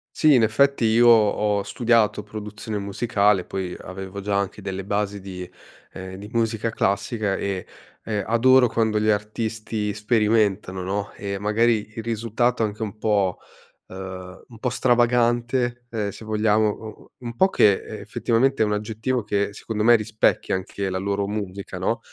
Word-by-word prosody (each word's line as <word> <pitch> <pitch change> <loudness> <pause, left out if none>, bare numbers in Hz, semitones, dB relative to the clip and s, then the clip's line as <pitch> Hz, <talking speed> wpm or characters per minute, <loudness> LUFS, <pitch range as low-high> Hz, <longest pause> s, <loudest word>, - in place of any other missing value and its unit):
Sì, 155 -1 +5
in 125 - +5
effetti 140 +3 +3
io 115 +2 +5
ho 105 -2 +4
studiato 110 -1 +1
produzione 105 +1 -6
musicale, 100 -1 +1
poi 95 -2 -4
avevo 95 +1 -7
già 100 0 -1
anche 100 +1 -3
delle 95 -1 -4
basi 100 0 -2
di, 90 -2 -8 0.4
ehm, 95 0 -8
di 100 +2 -9
musica 115 -1 0
classica 100 0 0
e 95 -2 -3 0.4
e 105 -2 -2
adoro 125 +2 +5
quando 110 -1 +1
gli 110 - +1
artisti 110 0 -2
sperimentano, 105 -3 +1
no, 100 +3 -3
e 100 -1 -4
magari 110 +1 +1
il 115 - -4
risultato 115 +1 0
è - - +4
anche 105 +1 -6
un 110 0 -4
po', 100 -4 +1 0.5
uhm, 95 0 -8
un 120 -3 -14
po' 125 - -1
stravagante 120 0 +1
e 105 -3 -2
se 110 - -11
vogliamo 110 0 +2
o 110 +1 -6
o 110 - -14 0.2
un 125 - -7
un 115 - -6
po' 190 +9 +4
che 105 - +5
e - - -7
effettivamente 125 +2 +1
è - - +3
un 105 - -1
aggettivo 110 +4 -2
che 100 0 -1
secondo 105 +1 -3
me 120 +2 +7
rispecchia 110 -3 +1
anche 95 +1 -4
la 95 - -2
loro 100 +1 -1
musica, 100 -2 -5
no, 115 +6 -1
105 Hz, 170 wpm, -23 LUFS, 100-115 Hz, 0.5 s, me